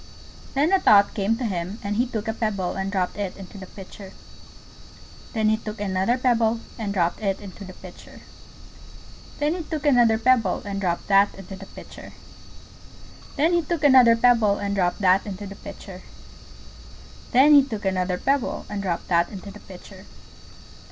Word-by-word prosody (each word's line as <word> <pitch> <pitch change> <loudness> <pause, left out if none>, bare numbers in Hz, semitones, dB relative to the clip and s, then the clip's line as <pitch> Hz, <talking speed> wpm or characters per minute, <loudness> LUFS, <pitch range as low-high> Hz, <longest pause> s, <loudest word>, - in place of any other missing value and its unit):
Then 300 +7 +2
a 385 - +5
thought 205 - +5
came 215 +1 0
to 250 - -3
him, 185 -1 -3
and 205 +1 -2
he 245 +4 +1
took 225 -3 -5
a 220 - -1
pebble 205 -5 -2
and 195 0 -3
dropped 185 -2 -2
it 200 -3 -4
into 195 +1 -11
the 190 - -9
Pitcher. 195 0 -12 1.2
Then 220 -2 +1
he 220 - +2
took 215 0 -8
another 195 +4 0
pebble 235 -3 +1 0.2
and 210 -3 -3
dropped 175 0 -1
it 195 -2 -1
into 200 0 -10
the 185 -1 -10
Pitcher. - - -14 1.2
Then 295 +2 0
he 355 - -4
took 310 -2 -5
another 240 -6 +4
pebble 225 -5 +2
and 200 -1 -4
dropped 175 -3 -2
that 200 0 +4
into 195 0 -9
the 195 0 -11
Pitcher. - - -12 1.2
Then 320 +5 +2
he 345 - +3
took 330 -1 -3
another 255 -5 +7
pebble 230 -4 +3
and 200 0 -3
dropped 180 -1 0
that 190 0 +4
into 205 0 -7
the 195 - -8
Pitcher. - - -11 1.3
Then 275 +5 +6
he 285 - +9
took 220 -7 -6
another 185 -1 0
pebble 275 +5 -1
and 205 -1 -3
dropped 180 -3 -3
that 170 -1 +2
into 200 0 -9
the - - -12
Pitcher. - - -13
205 Hz, 175 wpm, -23 LUFS, 195-240 Hz, 1.3 s, he